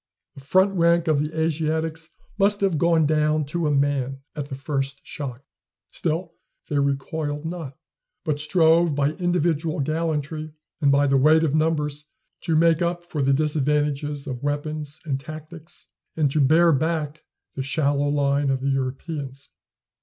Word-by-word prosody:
The 140 - -12
front 185 +8 +3
rank 170 -1 +3
of 155 -3 +3
the 155 +1 -3
Asiatics 160 0 -1 0.3
must 200 +1 +3
have 190 -6 +1
gone 165 -1 +3
down 155 0 +2
to 160 +3 -2
a - - +1
man 140 -2 0
at 145 -2 -5
the 135 - -4
first 135 0 -3
shock. 135 -4 -6 0.5
Still 165 +1 -2 0.3
they 145 - 0
recoiled 145 +2 -2
not, 160 -5 -6 0.5
but 150 -3 -1
strove 160 0 +3
by 145 +1 +2
individual 165 -3 0
gallantry 155 0 -2 0.3
and 140 -2 +4
by 140 +1 +4
the 135 -1 +3
weight 155 +4 +5
of 150 -3 +1
numbers 150 -2 0 0.4
to 165 -2 +1
make 165 +1 +4
up 175 0 -1
for 160 -4 -4
the 135 0 +3
disadvantages 145 0 0
of 130 -4 -5
weapons 145 +1 -3
and 135 -3 -1
tactics, 155 +3 -10 0.3
and 150 -4 +2
to 150 - +2
bear 165 +5 +5
back 155 0 -1 0.3
the 135 - -4
shallow 140 +1 +1
line 140 -1 +1
of 135 -1 0
the 140 - 0
Europeans. 135 +1 -4
150 Hz, 155 wpm, -24 LUFS, 140-160 Hz, 0.5 s, weight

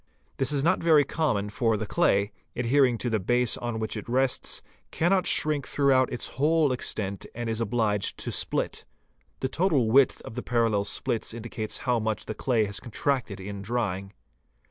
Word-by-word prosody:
This 135 +1 +1
is 140 -2 +1
'not 170 +4 +2
very 160 -3 +5
common 105 -10 -1
for 115 -1 +1
the 110 - -3
clay, 100 0 +2 0.2
adhering 125 0 +3
to 120 - -2
the 110 - +1
base 120 +4 +2
on 120 -2 -4
which 110 0 -3
it 105 +1 -6
rests, 130 +1 0 0.3
cannot 180 +2 +1
shrink 150 -3 +1
throughout 135 -2 +3
its 125 - -3
whole 155 -1 +4
extent 100 -5 -3
and 120 0 -4
is 115 0 -1
obliged 110 -3 0
to - - -4
split. - - -1 0.6
The 130 - +1
total 140 -6 +1
width 135 +1 +5
of - - -8
the 125 - -4
parallel 115 -5 +1
splits 115 +2 -2
indicates 110 -2 -5
how 125 -2 +2
much 110 -1 -2
the - - -4
clay 115 -1 +1
has 100 0 -4
con 120 - -11
tracted 125 -6 -1
in 100 +1 -6
drying. 100 -3 -2
120 Hz, 180 wpm, -27 LUFS, 110-135 Hz, 0.6 s, very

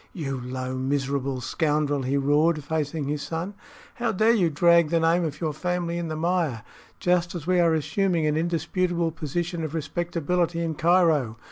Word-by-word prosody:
"You 135 -7 -4
low, 130 +1 -4
miserable 135 0 -1
scoundrel!" 145 +1 0
he 135 +2 0
roared, 150 +3 +2
facing 150 -1 -2
his 145 0 -2
son; 170 +6 -4 0.4
"how 235 -1 -1
dare 220 +3 +3
you 185 -7 +3
drag 170 +1 +4
the 170 0 +2
name 165 +2 +3
of 150 -2 -4
your 155 -2 -1
family 175 +1 -2
in 170 - -3
the 155 - -3
mire, 160 - 0 0.4
just 175 0 +1
as 165 -3 -5
we 180 0 +2
are 165 -2 +4
assuming 175 +1 0
an 150 0 +1
indisputable 170 +1 0
position 165 +3 -3
of 155 0 -4
respectability 170 +2 -1
in 165 -1 -1
Cairo? 160 -8 +2
160 Hz, 170 wpm, -25 LUFS, 145-175 Hz, 0.4 s, drag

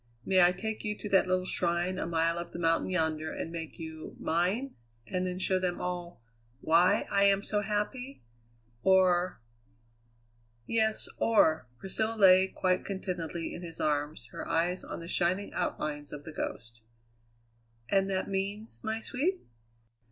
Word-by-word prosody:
May 190 -1 +4
I 175 0 +7
take 215 +4 -4
you 210 -1 -2
to 210 - -6
that 190 -1 +4
little 185 0 +1
shrine 175 +1 0
a - - -2
mile 165 0 +1
up 170 0 -7
the - - -5
mountain 165 0 +1
yonder 160 -3 0
and 165 - -5
make 165 -2 -6
you 160 -1 -8
mine 190 +11 0 0.3
and 185 -1 -1
then 180 0 -3
show 185 0 +1
them 180 -1 -1
all 175 -4 -4 0.4
why 165 +5 +4
I 200 0 +4
am 200 0 +4
so 210 0 0
happy? 210 - -3 0.6
Or 185 -1 +3 0.6
" 115 0 -38
"Yes. 220 -1 +2
Or 160 - +3
" - - -34
Priscilla 220 - -2
lay 190 -2 +7
quite 185 -1 0
contentedly 175 -4 -4
in - - -7
his 165 -2 -7
arms, 150 -4 -1
her - - -6
eyes 175 +3 +1
on - - -6
the 165 - -8
shining 180 +3 0
outlines 150 -4 -3
of 145 - -7
The 160 - -9
Ghost. 115 -5 -5 1.1
"And 195 +6 +2
that 190 -1 -1
means, 200 +3 -3
my 220 0 -2
sweet?" 325 - -1
180 Hz, 160 wpm, -30 LUFS, 165-195 Hz, 1.1 s, I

